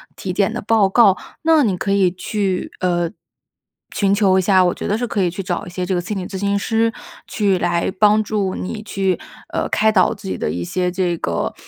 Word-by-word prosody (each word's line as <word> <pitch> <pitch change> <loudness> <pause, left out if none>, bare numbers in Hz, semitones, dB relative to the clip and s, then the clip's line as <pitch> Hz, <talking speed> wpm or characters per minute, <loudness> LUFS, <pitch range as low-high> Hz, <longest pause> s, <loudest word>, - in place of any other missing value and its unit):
体 185 - -5
检 195 +1 +1
的 - - -4
报 215 -1 +3
告。 195 -1 +5 0.3
那 320 -2 +4
你 205 -6 +1
可 195 +2 -2
以 195 -2 +3
去， 190 +1 -2
呃， 175 -2 +1 0.9
寻 200 -1 +2
求 200 -2 +3
一 - - +4
下 185 0 +4
我 175 - +2
觉 - - -5
得 210 - 0
是 245 +1 -2
可 205 -4 0
以 180 - +2
去 180 - -5
找 180 -2 -3
一 - - -8
些 180 +1 -4
这 185 - -1
个 175 - 0
心 200 +4 -4
理 185 - -4
咨 195 - -6
询 200 +1 0
师 225 +2 +1 0.4
去 200 -3 +1
来 175 -1 0
帮 210 0 +5
助 200 -3 -1
你 215 +3 -5
去， 195 -3 -1 0.3
呃， - - -1
开 220 0 +3
导 185 -4 +3
自 195 - -10
己 - - -3
的 - - -2
一 85 +1 -3
些 180 - -1
这 180 -1 0
个， - - -2
195 Hz, 245 characters per minute, -19 LUFS, 180-210 Hz, 0.9 s, 告